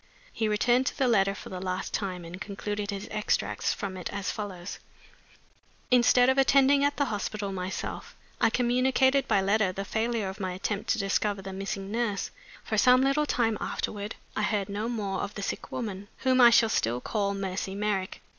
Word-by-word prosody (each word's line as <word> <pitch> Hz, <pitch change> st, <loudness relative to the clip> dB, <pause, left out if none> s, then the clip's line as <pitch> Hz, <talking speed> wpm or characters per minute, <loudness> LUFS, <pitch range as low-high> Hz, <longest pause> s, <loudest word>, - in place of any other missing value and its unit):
He 220 Hz, -, 0 dB
returned 240 Hz, +4 st, +2 dB
to -, -, -2 dB
the 265 Hz, -, +2 dB
letter 195 Hz, -4 st, +3 dB
for -, -, -9 dB
the 185 Hz, -, -5 dB
last 185 Hz, 0 st, -3 dB
time, 185 Hz, -4 st, -3 dB
and 175 Hz, +3 st, -9 dB
concluded 205 Hz, 0 st, -4 dB
his 200 Hz, -1 st, -4 dB
extracts 215 Hz, 0 st, 0 dB
from 195 Hz, -2 st, -4 dB
it 180 Hz, -, -5 dB
as 200 Hz, -1 st, -2 dB
follows: 190 Hz, -4 st, -6 dB, 1.1 s
"'Instead 250 Hz, 0 st, +5 dB
of 265 Hz, +1 st, +3 dB
attending 275 Hz, +1 st, +5 dB
at 285 Hz, 0 st, +1 dB
the 285 Hz, -, +2 dB
hospital 205 Hz, 0 st, -3 dB
myself, 185 Hz, 0 st, -5 dB, 0.3 s
I -, -, +5 dB
communicated 260 Hz, +3 st, +2 dB
by 195 Hz, -, +3 dB
letter 200 Hz, 0 st, +2 dB
the 195 Hz, +2 st, -5 dB
failure 220 Hz, 0 st, -1 dB
of 190 Hz, +2 st, -6 dB
my 185 Hz, -2 st, -2 dB
attempt 200 Hz, +2 st, -3 dB
to -, -, +3 dB
discover 200 Hz, -1 st, 0 dB
the 195 Hz, 0 st, -6 dB
missing 195 Hz, 0 st, -4 dB
nurse. 225 Hz, -3 st, -1 dB, 0.3 s
For -, -, 0 dB
some 255 Hz, 0 st, +6 dB
little 285 Hz, +2 st, +2 dB
time 225 Hz, -5 st, +1 dB
afterward 205 Hz, 0 st, -3 dB, 0.2 s
I -, -, 0 dB
heard 210 Hz, -2 st, 0 dB
no 210 Hz, +3 st, -2 dB
more 210 Hz, -5 st, -2 dB
of 205 Hz, -, -5 dB
the 200 Hz, -, -5 dB
sick -, -, -4 dB
woman, 205 Hz, -4 st, -4 dB
whom 260 Hz, -1 st, +4 dB
I 240 Hz, -, +10 dB
shall 230 Hz, -1 st, +5 dB
still 120 Hz, -, 0 dB
call 200 Hz, -, -1 dB
Mercy 190 Hz, 0 st, -3 dB
Merrick. 200 Hz, -2 st, -2 dB
210 Hz, 190 wpm, -28 LUFS, 195-240 Hz, 1.1 s, I